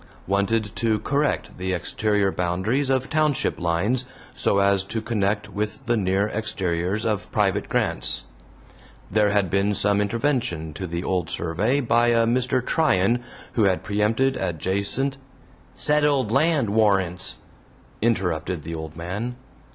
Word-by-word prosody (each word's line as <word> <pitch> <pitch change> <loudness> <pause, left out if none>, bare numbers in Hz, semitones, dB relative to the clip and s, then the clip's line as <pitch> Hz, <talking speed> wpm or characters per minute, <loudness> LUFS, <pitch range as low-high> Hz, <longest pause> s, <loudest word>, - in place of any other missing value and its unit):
Wanted 100 +2 0
to 110 -2 +1
correct 140 0 -1
the 95 0 -1
exterior 105 +2 0
boundaries 95 +11 -1
of 130 0 +1
township 155 -3 +1
lines, 100 +10 0 0.3
so 100 - +1
as 100 -1 +3
to 110 - -3
connect 105 -2 -1
with 105 +6 -4
the 120 -1 +2
near 100 -1 +1
exteriors 95 -2 -2
of 105 -3 -2
private - - 0
grants. - - 0 0.9
There 105 +1 +3
had 100 -4 +1
been 100 +1 +1
some 100 +1 +2
intervention 115 - -1
to 95 +4 -5
the 85 +1 -4
old 90 -4 -1
survey 110 - 0
by 120 -1 +3
a 115 -1 +4
Mr. 125 +2 +1
Tryan 120 - +2 0.3
who 110 - +3
had 95 -2 +1
preempted 110 +6 +1
adjacent 100 - 0 0.6
"settled 145 -6 +2
land 140 -4 +2
warrants," 95 -5 +1 0.6
interrupted 90 -7 0
the 85 - -6
old 80 -1 -6
man. 100 +9 -4
105 Hz, 135 wpm, -24 LUFS, 95-120 Hz, 0.9 s, a